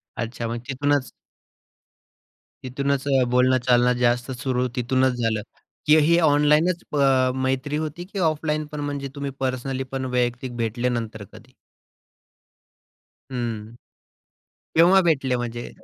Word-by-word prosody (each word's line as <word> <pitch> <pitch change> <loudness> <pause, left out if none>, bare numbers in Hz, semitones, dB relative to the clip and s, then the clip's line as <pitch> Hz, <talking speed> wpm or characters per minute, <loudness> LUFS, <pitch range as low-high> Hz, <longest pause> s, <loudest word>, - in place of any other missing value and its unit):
अच्छा! 115 0 -4
मग 115 +1 -3
तिथूनच 140 0 0 1.5
तिथूनच 140 +1 -1
अ, 135 -2 +3
बोलणं-चालणं 125 -1 +3
जास्त 120 +1 +1
सुरू 130 0 -1
तिथूनच 130 +1 +1
झालं 110 -2 0 0.5
की 150 +1 +7
ही 170 +1 +5
ऑनलाईनच 150 +3 +3
प 150 - -1 0.5
मैत्री 135 +3 -1
होती? 155 +3 -5
की 195 +1 -6
ऑफलाईनपण 155 -1 -3
म्हणजे 140 -1 -4
तुम्ही 140 -1 -4
पर्सनलीपण 130 0 -3
वैयक्तिक 120 0 -1
भेटले 120 +2 -1
नंतर 110 -2 -6
कधी? - - -15 1.8
हं, 115 -3 -4 1.0
केव्हा 175 +4 +6
भेटले 140 -7 +1
म्हणजे? 120 0 -5
130 Hz, 110 wpm, -23 LUFS, 120-145 Hz, 1.8 s, की